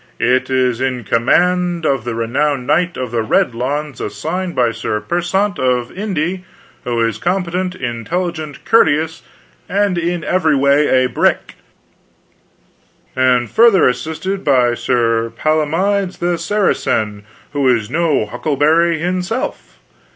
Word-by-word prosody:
It 125 +2 +1
is 130 -2 +1
in 130 -2 -1
com 115 +3 -1
and 180 -1 +2
of 135 -6 0
the 120 -1 -3
renowned 130 +4 -1
Knight 170 +5 +1
of 125 -3 -4
the 115 -1 0
Red 110 +2 +1
Lawns, 140 +3 -3
assissted 170 - -4
by 120 -2 +2
Sir 115 -2 -3
Persant 175 - -1
of 125 0 0
Inde, 185 -2 -2 0.4
who 120 -1 -1
is 115 -1 -4
compete9t. 180 - -2
intelligent, 155 +6 -4
courte 200 -1 +5
ous, 160 +1 -5 0.5
and 200 -2 +1
in 170 -1 -2
every 160 -5 +1
way 140 -1 +3
a - - +2
brick, 125 - 0 1.6
and 125 -2 +2
fur 235 +1 +6
tHer 195 -5 +4
assisted 160 +9 -3
by 125 -4 +3
Sir 115 -2 0
Palamides 180 +6 0
the 175 -1 -1
Sara 205 +3 +1
cen, 105 -2 -2 0.3
who 140 -2 +1
is 115 -3 +1
no 160 -7 +1
huckleberry 155 +8 +1
hinself. 185 - -3
150 Hz, 135 wpm, -17 LUFS, 125-180 Hz, 1.6 s, fur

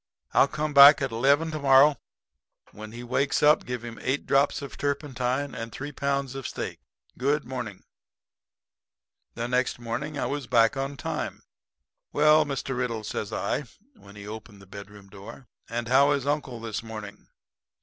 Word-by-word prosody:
'I'll - - +5
come 155 +1 -3
back 140 +2 +9
at 135 -3 -2
eleven 140 +7 +2
to 155 - -4
morrow. 140 +1 +6 0.8
When 110 +1 -10
he 120 +2 -8
wakes 130 +4 0
up 150 +1 +4
give 125 -1 -4
him 115 -1 -8
eight 135 +3 -1
drops 140 +1 +2
of 140 - -8
turpentine 140 -1 -2
and 115 0 -6
three 145 +5 -6
pounds 140 -1 -2
of 135 -2 -5
steak. - - -5 0.4
Good 145 +3 +1
morning.' 120 -6 -6 1.5
"The 120 0 -3
next 125 +1 0
morning 120 +6 -5
I - - -1
was 145 -2 -4
back 115 -1 +4
on 135 +1 -4
time. - - -4 0.7
'Well, 150 +1 +5
Mr. 135 -2 -3
Riddle,' 120 -3 -2
says 105 -1 -4
I, 140 +8 -2 0.3
when 100 - -16
he 100 0 -10
opened 105 -1 -9
the 95 - -15
bedroom 100 +1 -12
door, 105 +7 -12 0.2
'and 115 0 -3
how 140 +3 +5
is 140 -2 -2
uncle 145 -4 -2
this 110 -2 -4
morning?' 110 -2 -9
130 Hz, 165 wpm, -26 LUFS, 115-140 Hz, 1.5 s, back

